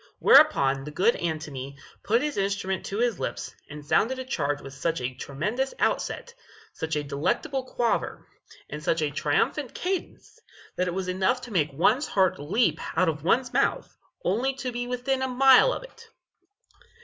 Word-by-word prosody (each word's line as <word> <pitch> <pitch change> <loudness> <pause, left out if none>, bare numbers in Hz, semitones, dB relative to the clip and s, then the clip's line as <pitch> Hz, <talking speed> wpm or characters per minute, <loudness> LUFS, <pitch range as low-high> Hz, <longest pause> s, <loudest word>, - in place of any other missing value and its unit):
Whereupon 135 0 +5
the 150 - -7
good 195 +10 +2
Antony 150 -5 -4 0.2
put 230 +5 +1
his 300 -1 -2
instrument 195 -1 -1
to 200 - -4
his 235 -4 0
lips, - - -4 0.2
and 150 0 -9
sounded 240 - +2
a 260 - -5
charge 145 - -1
with 135 - -10
such 165 +4 -2
a 125 0 -3
tremendous 210 - -3
outset, 475 - -1 0.4
such 160 -1 -3
a 150 - -1
delectable 155 - -1
quaver, 240 -2 -1 0.4
and 150 0 -7
such 165 0 +1
a 145 - -1
triumphant 155 - 0
cadence, 375 +5 -4 0.4
that 180 - 0
it 175 - -2
was 190 -1 -3
enough 190 +7 +1
to 245 - -9
make 155 -5 +1
one's 215 - +2
heart 190 -5 +2
leap 190 +12 +1 0.2
out 185 0 +4
of 150 -2 -4
one's 245 +8 +1
mouth - - 0 0.3
only 245 +8 +1
to 260 -1 -4
be 245 0 -4
within 250 +2 -1
a 265 - 0
mile 265 - +6
of - - -4
it. 465 -2 -15
190 Hz, 175 wpm, -26 LUFS, -, 0.4 s, mile